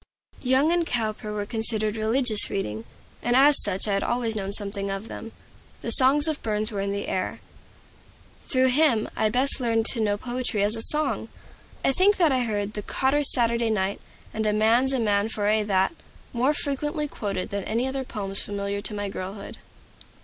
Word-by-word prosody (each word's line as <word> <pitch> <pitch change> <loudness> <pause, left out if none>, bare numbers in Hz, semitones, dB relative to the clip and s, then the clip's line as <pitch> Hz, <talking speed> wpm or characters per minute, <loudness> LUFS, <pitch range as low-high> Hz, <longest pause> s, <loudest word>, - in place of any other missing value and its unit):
Young 265 +5 +2
and 345 0 +2
Cowper 220 -6 -3
were 210 -1 -3
considered 220 -1 -1
religious 220 0 +3
reading, 110 - -4 0.4
and 240 0 0
as 280 +2 +5
such 195 +1 +2
I 205 - 0
had 195 - 0
always 235 -2 -1
known 195 -2 -4
something 200 -1 0
of 195 +3 -5
them. 225 - -8 0.5
The - - -3
songs 285 +3 +4
of 310 -2 -2
Burns 215 0 -1
were 200 -2 -3
in 200 0 -2
the 200 0 -4
air. 185 - -3 1.1
Through 260 -1 +2
him 255 -5 +2
I 215 - +1
best 260 +6 0
learned 225 -3 0
to 240 - -4
know 205 -2 0
poetry 240 -3 -2
as 210 +2 +4
song. 305 0 +2 0.6
I - - +4
think 390 +8 +3
that 330 -5 +3
I 255 -2 +1
heard 205 -2 -3
the 210 - -4
"Cotter's 275 +6 +1
Saturday 235 -1 +2
Night" 200 -2 -1 0.3
and 220 0 -2
"A 210 - +1
man's 230 +5 +3
a 265 - +1
man 205 -1 +1
for 210 -2 -3
a' 215 +1 +2
that" 195 - +1 0.4
more 255 +5 +1
frequently 295 +2 -2
quoted 200 -8 -5
than 200 -1 -3
any 235 +4 -1
other 265 0 -3
poems 195 -5 -4
familiar 200 0 -4
to 210 +1 -3
my 205 0 -3
girlhood. 195 +1 -7
220 Hz, 185 wpm, -24 LUFS, 205-260 Hz, 1.1 s, as